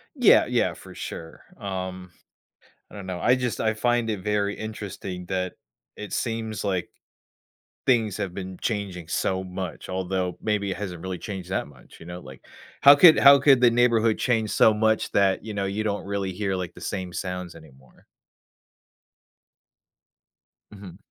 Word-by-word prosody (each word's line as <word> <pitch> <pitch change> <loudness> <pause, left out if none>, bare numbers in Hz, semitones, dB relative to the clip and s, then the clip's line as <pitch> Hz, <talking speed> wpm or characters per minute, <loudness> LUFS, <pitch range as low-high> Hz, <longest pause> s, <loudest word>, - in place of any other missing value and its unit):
Yeah, - - +6
yeah, - - +1
for - - -13
sure, 80 0 -8 0.2
um, 95 -2 -5 0.8
I - - -12
don't 100 - -8
know, 90 -1 -5
I 125 +7 +4
just 125 -5 -2
I 110 0 +1
find 120 0 0
it 105 -4 -3
very 105 -1 0
interesting 100 -4 -7
that 90 -1 -2 0.4
it 105 -2 -8
seems 110 -3 -3
like 95 -4 -2 1.0
things 115 -6 +2
have 95 -4 -4
been 95 -2 -7
changing 95 -7 -3
so 95 +1 -1
much, 95 -1 -6
although 95 -1 -2
maybe 105 -2 -1
it - - -3
hasn't 90 -4 -6
really 95 -1 -4
changed 95 -3 -7
that 95 - -1
much, 65 -3 -17
you 80 - -12
know? 90 +1 -7
Like, 65 -4 -13 0.4
how 140 +1 +10
could 160 +2 +8
how 140 0 +8
could 135 -2 +5
the 120 -1 +6
neighborhood 115 -2 +3
change 110 -3 0
so 110 - +5
much 110 +1 +1
that, 100 -1 +2
you 110 -1 -6
know, 100 -1 -1
you 100 +2 -2
don't 100 -1 -2
really 100 -1 -3
hear, 95 +1 -2
like, 90 -2 -4
the - - -13
same 95 -2 -4
sounds 90 -2 -5
anymore? 65 -6 -18 2.7
Mhm. 95 -3 -11
100 Hz, 165 wpm, -25 LUFS, 90-110 Hz, 2.7 s, how